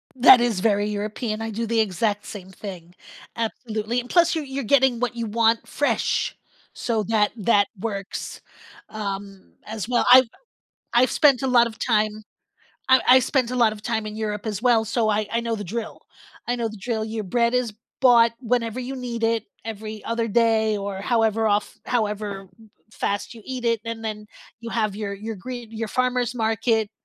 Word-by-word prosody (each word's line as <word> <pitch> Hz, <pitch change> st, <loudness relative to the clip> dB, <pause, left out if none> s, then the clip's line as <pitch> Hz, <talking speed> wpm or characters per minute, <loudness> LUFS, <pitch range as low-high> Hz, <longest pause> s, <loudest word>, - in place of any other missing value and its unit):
That 250 Hz, -1 st, +8 dB
is 235 Hz, -5 st, +1 dB
very 205 Hz, 0 st, +1 dB
European, 215 Hz, +2 st, -3 dB
I 225 Hz, 0 st, -3 dB
do 230 Hz, +2 st, -3 dB
the 230 Hz, 0 st, 0 dB
exact 210 Hz, 0 st, 0 dB
same 190 Hz, -3 st, -9 dB
thing. 180 Hz, -3 st, -9 dB, 0.4 s
Absolutely, 225 Hz, 0 st, -2 dB
and 245 Hz, -, -13 dB
plus 345 Hz, -1 st, +4 dB
you're 315 Hz, -, -2 dB
you're 270 Hz, -1 st, -4 dB
getting 260 Hz, -1 st, +3 dB
what 245 Hz, -1 st, -1 dB
you 235 Hz, -1 st, -3 dB
want 225 Hz, +1 st, +2 dB
fresh, -, -, 0 dB, 0.4 s
so 225 Hz, -3 st, -1 dB
that 210 Hz, -2 st, +2 dB
that 205 Hz, -1 st, +3 dB
works, 200 Hz, -2 st, -5 dB, 0.5 s
um, 200 Hz, -2 st, -6 dB
as 215 Hz, -1 st, -5 dB
well, 245 Hz, -1 st, +1 dB
I've 255 Hz, +1 st, +9 dB, 0.7 s
I've 250 Hz, +2 st, +4 dB
spent 280 Hz, -5 st, +4 dB
a 265 Hz, -, 0 dB
lot 240 Hz, -2 st, +5 dB
of 225 Hz, -, -7 dB
time 215 Hz, -2 st, 0 dB, 0.7 s
I 260 Hz, 0 st, +6 dB
I 260 Hz, +1 st, +8 dB
spent 255 Hz, -1 st, 0 dB
a 255 Hz, -, -2 dB
lot 230 Hz, -3 st, +4 dB
of 210 Hz, -, -12 dB
time 220 Hz, -1 st, -2 dB
in 210 Hz, -, -6 dB
Europe 210 Hz, -1 st, -3 dB
as 210 Hz, -2 st, -3 dB
well, 230 Hz, -3 st, +3 dB
so 225 Hz, 0 st, 0 dB
I 215 Hz, 0 st, 0 dB
I 235 Hz, -, +1 dB
know 230 Hz, -1 st, -2 dB
the 205 Hz, -, -5 dB
drill. 220 Hz, +5 st, -5 dB, 0.5 s
I 245 Hz, -, +1 dB
know 230 Hz, -2 st, -2 dB
the 215 Hz, -, -10 dB
drill, 220 Hz, +1 st, -2 dB
your 220 Hz, -1 st, -4 dB
bread 235 Hz, +4 st, +1 dB
is 250 Hz, -3 st, 0 dB, 0.3 s
bought 235 Hz, -3 st, +6 dB
whenever 240 Hz, -1 st, -1 dB
you 255 Hz, +2 st, -5 dB
need 240 Hz, -3 st, -5 dB
it, 225 Hz, -1 st, +1 dB, 0.2 s
every 215 Hz, -1 st, -6 dB
other 230 Hz, 0 st, -1 dB
day 220 Hz, -1 st, +2 dB
or 200 Hz, -1 st, -5 dB
however 225 Hz, 0 st, +1 dB
of 205 Hz, 0 st, 0 dB
however 210 Hz, -4 st, -2 dB, 0.2 s
m 220 Hz, -1 st, -18 dB, 0.2 s
fast 205 Hz, +2 st, -2 dB
you 225 Hz, -, -12 dB
eat 255 Hz, 0 st, -5 dB
it, 230 Hz, -2 st, +1 dB
and 230 Hz, 0 st, -5 dB
then 210 Hz, -1 st, -5 dB, 0.3 s
you 230 Hz, -, -6 dB
have 215 Hz, -4 st, -1 dB
your 205 Hz, -1 st, -4 dB
your 215 Hz, +3 st, -6 dB
green 240 Hz, +3 st, -8 dB
your 225 Hz, 0 st, -4 dB
farmer's 250 Hz, 0 st, 0 dB
market 225 Hz, -1 st, +1 dB
225 Hz, 190 wpm, -23 LUFS, 210-240 Hz, 0.7 s, I've